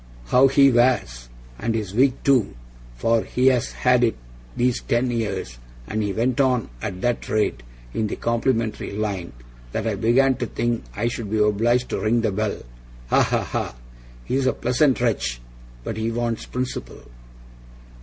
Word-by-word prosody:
How 130 +2 +6
HE 135 0 +5
wears! 120 - +1 0.3
and 115 0 -1
his 105 -4 -3
wig 130 +4 +4
too, 125 - +3 0.4
for 115 - +2
he's 125 0 +2
had 125 -1 +3
it 115 - +2 0.4
these 125 0 +1
ten 120 +1 0
years 95 - -3 0.3
and 110 - -2
he 105 -1 -1
went 120 +6 +1
on 130 -4 +1
at 90 - -5
that 120 -1 -1
rate 105 - 0 0.3
in 110 - 0
the - - -3
complimentary 115 -1 -1
line, 100 -4 -3 0.4
that 110 - -2
I 110 - 0
began 120 +6 +3
to 120 - -2
think 120 - -2
I 115 - 0
should 115 -3 -4
be 110 - 0
obliged 115 +4 +2
to - - -1
ring 110 +4 +2
the 110 -2 0
bell. 105 +1 -2 0.5
Ha! - - +5
ha! - - +1
ha! - - -3 0.5
He's 130 0 0
a - - +3
pleasant 125 +3 +2
wretch, 100 - 0 0.4
but - - -4
he 110 +1 -1
wants 115 -1 -2
principle. 125 - -5
115 Hz, 165 wpm, -23 LUFS, 105-125 Hz, 0.5 s, How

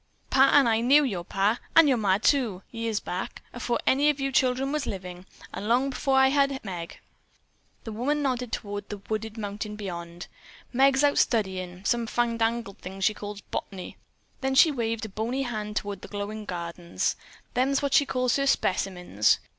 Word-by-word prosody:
Pa 270 0 +6
and 280 -4 +6
I 225 0 +2
knew 280 +5 +6
your 195 -10 -2
pa, 200 +6 +1 0.2
and 330 -2 +8
your 270 - +4
ma, 195 -3 +3
too, 225 -5 +1
years 230 -2 -2
back, 180 +1 -5
afore 240 0 -1
any 285 +3 +4
of 295 -1 0
you 275 0 -1
children 260 +1 +2
was 300 -1 -2
living, 185 -2 -6 0.3
and 205 - -5
long 260 +3 +2
afore 270 0 +1
I 265 0 +6
had 275 -2 +1
Meg." 175 -4 -6 0.9
The 225 - -6
woman 285 +7 -1
nodded 250 -3 -1
toward 205 -1 -5
the 210 - -5
wooded 215 +2 -5
mountain 210 0 -5
beyond. 175 -4 -6 0.5
"Meg's 270 +2 +4
out 290 -1 +4
studyin' 190 -4 -1
some 235 +1 +1
fandangled 230 -3 -1
thing 190 +1 -8
she 205 +3 +2
calls 205 -1 -7
bot'ny." 190 -3 -5 0.4
Then 265 -1 -1
she 310 +3 +7
waved 230 -3 -2
a - - -7
bony 230 +7 -2
hand 215 -4 -4
toward 200 -2 -3
the - - -9
glowing 210 +1 -5
gardens. 170 -1 -3 0.4
"Them's 270 +3 +1
what 280 -1 0
she 285 - +5
calls 255 0 +1
her 275 0 0
specimens. 180 - +2
225 Hz, 180 wpm, -27 LUFS, 200-265 Hz, 0.9 s, and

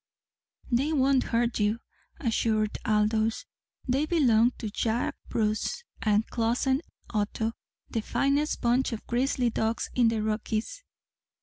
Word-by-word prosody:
"They 275 +6 +2
won't 270 -2 +3
hurt 235 0 0
you," 210 +2 +2 0.4
assured 220 -5 0
Aldous. 220 - +1 0.4
"They 270 +4 +1
belong 245 -8 +4
to 215 -3 -5
Jack 225 +3 -1
Bruce 215 - -1 0.2
and 215 0 +2
Clossen 245 +4 +1 0.3
Otto 220 +1 -1 0.3
the 225 - -2
finest 280 +6 0
bunch 245 +1 +2
of 220 - -6
grizzly 245 0 +1
dogs 225 +1 -1
in 245 -2 +4
the 225 -1 +1
Rockies." 220 - -2
230 Hz, 120 wpm, -28 LUFS, 220-260 Hz, 0.4 s, belong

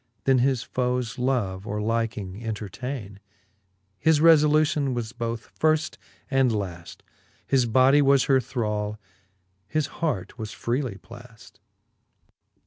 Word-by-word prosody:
Then 135 -1 +4
his 130 -1 +1
foes 125 -3 -2
love 110 -7 -1
or 105 +1 -3
liking 110 -2 -2
entertainer 110 0 -5 0.8
His 160 -2 +3
refblution 150 -3 +4
was 115 -2 -3
both 115 -1 -5
firft 155 0 +1 0.3
and 135 -2 +3
laft, 90 -6 -5 0.4
His 130 -3 +2
bodie 130 +5 +5
was 140 -2 +4
her 135 -1 +3
thrall, 105 -4 -3 0.7
his 155 +7 0
hart 130 - -3
was 110 -1 -5
freely 120 -2 -2
plafl 120 +1 -15
125 Hz, 115 wpm, -25 LUFS, 110-135 Hz, 0.8 s, bodie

